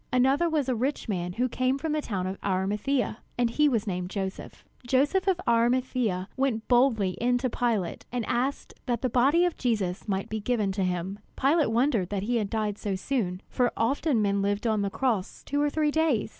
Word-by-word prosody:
Another 270 Hz, +6 st, +3 dB
was 300 Hz, -4 st, 0 dB
a 255 Hz, -, +1 dB
rich 255 Hz, +5 st, -2 dB
man 180 Hz, -4 st, -2 dB
who 250 Hz, +6 st, +1 dB
came 255 Hz, +2 st, 0 dB
from 315 Hz, +2 st, -3 dB
the 305 Hz, 0 st, 0 dB
town 195 Hz, -9 st, -3 dB
of 190 Hz, +1 st, -4 dB
Arimathea, 210 Hz, +7 st, 0 dB, 0.2 s
and 240 Hz, -1 st, 0 dB
was 230 Hz, -5 st, 0 dB
named 180 Hz, -3 st, -3 dB
Joseph. 190 Hz, -1 st, -5 dB, 0.2 s
Joseph 290 Hz, +10 st, +2 dB
of 375 Hz, -2 st, +2 dB
Arimathea 235 Hz, -5 st, +1 dB
went 260 Hz, -5 st, -1 dB
boldly 240 Hz, -6 st, +3 dB
in 245 Hz, +1 st, +3 dB
to 255 Hz, 0 st, -1 dB
Pilate, 220 Hz, -9 st, -1 dB
and 245 Hz, -2 st, -2 dB
asked 260 Hz, +6 st, -1 dB
that 240 Hz, -1 st, -1 dB
the 255 Hz, -, 0 dB
body 280 Hz, +9 st, +4 dB
of 350 Hz, -, -1 dB
Jesus 210 Hz, -6 st, -1 dB
might 195 Hz, -1 st, -1 dB
be 220 Hz, -, -3 dB
given 210 Hz, -2 st, 0 dB
to 190 Hz, 0 st, -1 dB
him. 180 Hz, +2 st, -2 dB, 0.2 s
Pilate 295 Hz, +2 st, +3 dB
wondered 230 Hz, -5 st, +1 dB
that 200 Hz, -2 st, -2 dB
he 240 Hz, +3 st, 0 dB
had 210 Hz, -3 st, -1 dB
died 210 Hz, -2 st, -2 dB
so 200 Hz, -2 st, -2 dB
soon, 185 Hz, -4 st, -2 dB
for 250 Hz, -2 st, +1 dB
often 260 Hz, -1 st, +1 dB
men 200 Hz, 0 st, +1 dB
lived 205 Hz, +2 st, -1 dB
on 220 Hz, -2 st, +2 dB
the 200 Hz, -, 0 dB
cross 220 Hz, -4 st, -2 dB
two 285 Hz, +1 st, -1 dB
or 295 Hz, -, +2 dB
three 300 Hz, 0 st, +1 dB
days. 310 Hz, -10 st, +1 dB
235 Hz, 200 wpm, -27 LUFS, 200-265 Hz, 0.2 s, body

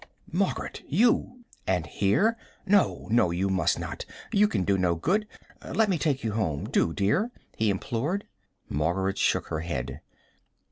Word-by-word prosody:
"Margaret, -, -, -1 dB
you! 240 Hz, -, +2 dB, 0.2 s
and 90 Hz, -4 st, +1 dB
here? 105 Hz, -, +2 dB, 0.3 s
No, 200 Hz, -1 st, +2 dB
no, 115 Hz, -6 st, +4 dB
you 90 Hz, +3 st, 0 dB
must 95 Hz, -1 st, +2 dB
not. -, -, -5 dB, 0.3 s
You 210 Hz, +1 st, +5 dB
can 95 Hz, -, 0 dB
do 100 Hz, +1 st, +2 dB
no 90 Hz, -2 st, +2 dB
good. 200 Hz, -, 0 dB, 0.4 s
Let 220 Hz, -2 st, +1 dB
me 180 Hz, -4 st, +1 dB
take 145 Hz, -4 st, 0 dB
you 110 Hz, -, 0 dB
home, 95 Hz, -10 st, -1 dB
do, 80 Hz, -, +2 dB
dear," 105 Hz, -, +1 dB, 0.3 s
he 110 Hz, -1 st, +1 dB
implored. 125 Hz, -, -1 dB, 0.4 s
Margaret 90 Hz, +6 st, 0 dB
shook -, -, +1 dB
her 80 Hz, -, -2 dB
head. 70 Hz, -4 st, -4 dB
100 Hz, 150 wpm, -27 LUFS, -, 0.4 s, You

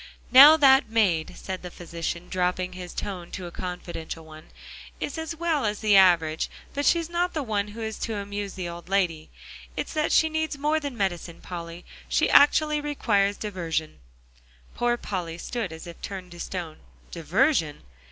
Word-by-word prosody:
"Now 285 Hz, +5 st, +10 dB
that 270 Hz, -5 st, +5 dB
maid," 195 Hz, -8 st, +1 dB
said 185 Hz, -1 st, -6 dB
the 180 Hz, -, -7 dB
physician, 170 Hz, 0 st, -5 dB
dropping 180 Hz, 0 st, -1 dB
his 180 Hz, -1 st, -8 dB
tone 180 Hz, -4 st, -5 dB
to 185 Hz, -, -5 dB
a 175 Hz, -, -7 dB
confidential 170 Hz, -2 st, -6 dB
one, 155 Hz, 0 st, -13 dB, 0.5 s
"is 290 Hz, -, -4 dB
as 320 Hz, 0 st, -4 dB
well 325 Hz, -3 st, 0 dB
as 210 Hz, -1 st, -1 dB
the 210 Hz, -2 st, +4 dB
average, 170 Hz, -4 st, +4 dB, 0.2 s
but 285 Hz, +1 st, -1 dB
she's 335 Hz, -1 st, +3 dB
not 345 Hz, +1 st, -1 dB
the 305 Hz, -, -1 dB
one 210 Hz, -4 st, -1 dB
who 215 Hz, +2 st, -9 dB
is 220 Hz, -1 st, -5 dB
to 225 Hz, -, -3 dB
amuse 205 Hz, 0 st, -5 dB
the 185 Hz, -2 st, -4 dB
old 170 Hz, +1 st, -9 dB
lady. 175 Hz, -5 st, 0 dB, 0.5 s
It's -, -, -3 dB
that 305 Hz, -1 st, 0 dB
she 320 Hz, -, +5 dB
needs 315 Hz, -2 st, -2 dB
more 300 Hz, +2 st, +1 dB
than 285 Hz, -5 st, -6 dB
medicine, 175 Hz, -4 st, -2 dB
Polly. 170 Hz, -1 st, -8 dB, 0.2 s
She -, -, +2 dB
actually 300 Hz, +1 st, +5 dB
requires 205 Hz, -9 st, +1 dB
diversion." 170 Hz, -6 st, -3 dB, 0.7 s
Poor 240 Hz, 0 st, +1 dB
Polly 175 Hz, -7 st, -4 dB
stood 225 Hz, 0 st, -4 dB
as 160 Hz, +2 st, -9 dB
if 170 Hz, -1 st, -11 dB
turned 185 Hz, -2 st, -7 dB
to 175 Hz, -, -11 dB
stone. 170 Hz, -4 st, -5 dB, 0.3 s
Diversion! 175 Hz, -, +1 dB
195 Hz, 170 wpm, -26 LUFS, 175-265 Hz, 0.7 s, Now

